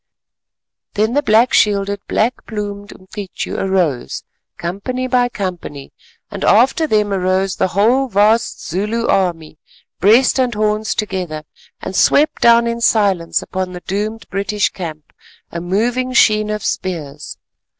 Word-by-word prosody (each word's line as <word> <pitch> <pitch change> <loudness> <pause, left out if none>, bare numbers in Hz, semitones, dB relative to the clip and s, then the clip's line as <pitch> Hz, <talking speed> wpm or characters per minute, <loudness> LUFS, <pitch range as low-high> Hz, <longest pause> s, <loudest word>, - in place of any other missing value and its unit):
Then 215 +3 +1
the 290 - +2
black 230 -1 +3
shielded, 200 -1 +2
black 235 +4 -1
plumed 205 -2 -5
Umcityu 190 0 -7
arose, 180 -10 -1 0.3
company 200 +9 -4
by 250 -1 +2
company, 180 - -6 0.4
and - - -6
after 270 - +3
them 210 -5 +1
arose 185 0 0
the - - +2
whole 230 +9 +2
vast 215 +1 +1
Zulu 210 +7 -2
army, 165 -5 -1 0.4
breast 235 +7 +4
and 250 -3 +1
horns 215 0 0
together, 180 -7 -3 0.4
and 190 - -6
swept 300 +10 +3
down 235 0 +5
in 235 0 -2
silence 200 -7 +2
upon 185 -1 -4
the 180 - -8
doomed 210 +4 -4
British 200 +1 0
camp, 155 -5 -8 0.4
a 170 - -5
moving 240 +8 -1
sheen 215 -4 +4
of 210 -1 -3
spears. 150 -5 -4
205 Hz, 130 wpm, -17 LUFS, 185-230 Hz, 0.4 s, down